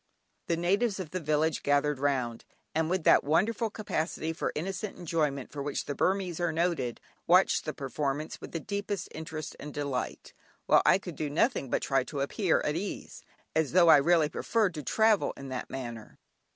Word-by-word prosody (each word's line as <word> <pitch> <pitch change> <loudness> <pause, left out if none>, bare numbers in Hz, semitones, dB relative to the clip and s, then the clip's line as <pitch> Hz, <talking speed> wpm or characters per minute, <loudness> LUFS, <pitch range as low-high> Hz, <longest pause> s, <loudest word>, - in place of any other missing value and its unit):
The 170 - +1
natives 200 +5 +1
of 180 -5 -6
the 185 - -2
village 155 0 +1
gathered 145 0 +1
round, 130 -5 -1 0.3
and 160 0 +1
with 185 -1 0
that - - +6
wonderful 205 - +1
capacity 165 -6 -3
for - - -2
innocent 190 +5 -4
enjoyment 150 -6 -1
for 145 - -5
which 140 0 -3
the 145 - -3
Burmese 185 0 0
are 175 -1 +1
noted, 160 -7 -1 0.3
watched - - +4
the - - -3
performance 145 +1 -3
with - - -8
the 165 - -3
deepest 200 0 -4
interest 155 -1 -6
and 150 - -7
delight, 140 -3 -4 0.3
while - - +5
I - - +7
could 180 -4 -8
do 150 - -3
nothing 155 - +1
but - - 0
try 135 -2 +2
to 140 -1 -4
appear 175 +5 +1
at 150 - -1
ease, 195 +4 -5 0.3
as 160 -2 +1
though 175 -2 +6
I 150 - +10
really 160 +2 +4
preferred 210 +4 0
to 155 - -5
travel 220 - +2
in 135 -1 -8
that 130 -1 -5
manner. 120 -4 -7
160 Hz, 185 wpm, -29 LUFS, 145-185 Hz, 0.3 s, I